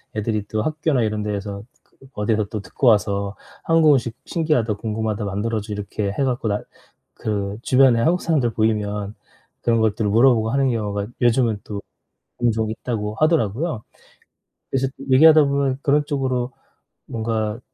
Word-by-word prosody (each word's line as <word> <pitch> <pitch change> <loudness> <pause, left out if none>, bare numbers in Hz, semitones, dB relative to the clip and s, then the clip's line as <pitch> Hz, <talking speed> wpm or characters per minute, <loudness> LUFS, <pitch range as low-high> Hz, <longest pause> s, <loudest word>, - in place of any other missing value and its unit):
애들이 110 -1 -1
또 110 0 -2
학교나 155 -2 0
이런 105 -1 -1
데에서 100 -1 -4 0.2
그 - - -36 0.2
어디서 105 0 0
또 110 - -3
듣고 130 - -4
와서 100 -2 +2 0.3
"한국 165 -2 +5
음식 120 -4 0
신기하다. 150 -10 0
궁금하다. 110 0 -3
만들어 105 +3 -2
줘." 105 0 -6
이렇게 100 0 -3
해 135 - -1
갖고 125 -3 -1
나 105 0 0 0.6
그 100 -1 -2
주변에 130 -3 +4
한국 170 +9 +2
사람들 145 -8 +1
보이면 105 -2 -1 0.5
그런 115 -1 +2
것들을 110 -1 +1
물어보고 115 -1 +4
하는 135 -1 +2
경우가 105 -3 -2
요즘은 120 -3 +2
또 100 -1 -5 0.6
종종 110 -2 +1
있다고 110 -2 -4
하더라고요. 155 - 0 0.9
그래서 135 0 +1 0.2
얘기하다 155 +3 +7
보면 140 -1 0
그런 145 +1 +3
쪽으로 130 -3 -1 0.6
뭔가 110 -1 -2
110 Hz, 340 characters per minute, -21 LUFS, 105-130 Hz, 0.9 s, 얘기하다